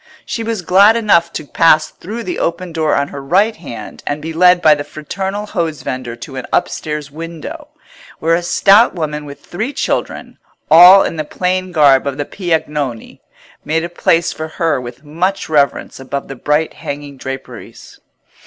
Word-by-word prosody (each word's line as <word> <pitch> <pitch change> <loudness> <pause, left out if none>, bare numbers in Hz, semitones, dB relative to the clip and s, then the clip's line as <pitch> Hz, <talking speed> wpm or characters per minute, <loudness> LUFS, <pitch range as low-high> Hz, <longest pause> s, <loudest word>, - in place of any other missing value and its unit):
She 230 - -4
was 225 -4 -3
glad 200 +6 +5
enough 185 -7 +2
to 155 - -5
pass 155 0 +3
through 220 +6 -7
the 355 - -4
open 170 +1 -3
door 160 -2 +1
on 140 0 0
her 140 - -7
right 195 +10 +2
hand 115 -10 -9
and 145 - -2
be 160 +2 -6
led 180 +2 +5
by 155 -3 +6
the 145 -1 -3
fraternal 190 +8 -5
hose 170 -7 -3
vendor 125 -2 -5
to 135 +3 -9
an 130 - -6
upstairs 150 -2 -2
window, 165 - -8 0.5
where 165 +1 +1
a 170 - +2
stout 200 +5 +4
woman 150 -3 -4
with 140 -1 -11
three 220 +10 -4
children, - - -3 0.3
all 180 +4 +9
in 165 - -4
the 155 - -1
plain 185 +4 -2
garb 140 -5 +4
of 140 -1 -3
Piagnoni, 150 - -3 0.4
made 160 +2 -1
a 170 - -4
place 170 0 +1
for 155 - -5
her 160 -4 -1
with 125 +3 -10
much 175 +6 -2
reverence 145 -4 0
above 135 +1 -5
the 135 - -6
bright 150 +5 0
hanging 145 0 -7
draperies. 135 0 -9
160 Hz, 170 wpm, -16 LUFS, 145-180 Hz, 0.5 s, all